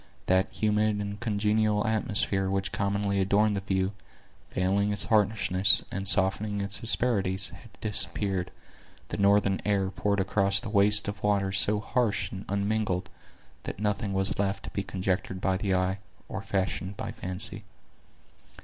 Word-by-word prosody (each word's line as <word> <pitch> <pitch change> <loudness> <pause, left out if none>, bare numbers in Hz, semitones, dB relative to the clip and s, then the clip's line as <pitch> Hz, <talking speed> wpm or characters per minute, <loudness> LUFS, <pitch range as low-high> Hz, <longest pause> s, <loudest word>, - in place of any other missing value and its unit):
That 95 +1 +2
humid 105 0 +1
and 100 0 -5
congenial 105 -1 0
atmosphere 100 -3 +2
which 95 +1 -2
commonly 100 -1 -1
adorned 105 +2 +2
the - - -1
view, 95 0 -1 0.6
veiling 100 +3 0
its 100 - 0
harshness, 105 -2 +3
and 100 0 -3
softening 100 +2 +4
its 100 0 +1
asperities, 100 -5 +1
had 115 - -14
disappeared, 100 -3 +2 0.6
the - - -4
northern 100 -1 +2
air 100 -2 0
poured 100 +1 -1
across 100 +1 +1
the 115 -4 -7
waste 105 0 +4
of 100 0 -5
water 100 -2 +1
so 105 +2 +2
harsh 110 -2 -1
and 95 +1 -8
unmingled, 100 -2 -1 0.5
that - - -7
nothing 105 0 -1
was 95 0 0
left 100 -1 -1
to - - -7
be 100 - -2
conjectured 95 -1 -3
by 95 0 0
the 95 0 -1
eye, 95 +2 -1 0.3
or - - -5
fashioned 95 0 -3
by - - -5
the - - -16
fancy. 100 +3 -4
100 Hz, 150 wpm, -27 LUFS, 95-105 Hz, 0.6 s, softening